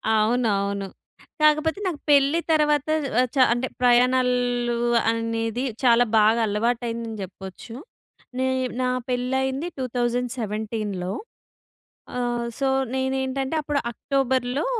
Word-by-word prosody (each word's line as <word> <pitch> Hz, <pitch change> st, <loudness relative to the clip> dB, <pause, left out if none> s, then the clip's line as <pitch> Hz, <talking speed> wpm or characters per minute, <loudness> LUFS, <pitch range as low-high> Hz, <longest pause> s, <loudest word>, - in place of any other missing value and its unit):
అవునవును. 205 Hz, -3 st, +1 dB, 0.5 s
కాకపోతే 305 Hz, +4 st, +3 dB
నాకు 325 Hz, -6 st, -3 dB
పెళ్ళి 285 Hz, +3 st, +4 dB
తర్వాత 300 Hz, -2 st, +3 dB, 0.3 s
ఆహ్ 255 Hz, -, +3 dB
చ -, -, -3 dB, 0.2 s
అంటే 250 Hz, +2 st, -2 dB
ప్రయాణాలు 245 Hz, -1 st, +2 dB, 0.4 s
అనేది 230 Hz, +1 st, -2 dB, 0.2 s
చాలా 240 Hz, -1 st, +6 dB
బాగా 215 Hz, +2 st, +4 dB
అలవాటయిందని 230 Hz, +1 st, -2 dB
చెప్పొచ్చు. 190 Hz, +4 st, -10 dB, 0.6 s
నే 260 Hz, 0 st, +1 dB, 0.3 s
నా 255 Hz, -, +1 dB, 0.2 s
పెళ్లి 250 Hz, +1 st, -1 dB
అయింది 265 Hz, +5 st, -2 dB
2017. 225 Hz, -6 st, -2 dB, 1.1 s
ఆహ్ 240 Hz, -1 st, -1 dB
సో 275 Hz, -, +1 dB, 0.3 s
నేనేంటంటే 265 Hz, +2 st, -1 dB
అప్పుడు 295 Hz, -1 st, -1 dB
అక్టోబర్‌లో 260 Hz, +1 st, -1 dB
245 Hz, 95 wpm, -24 LUFS, 230-265 Hz, 1.1 s, చాలా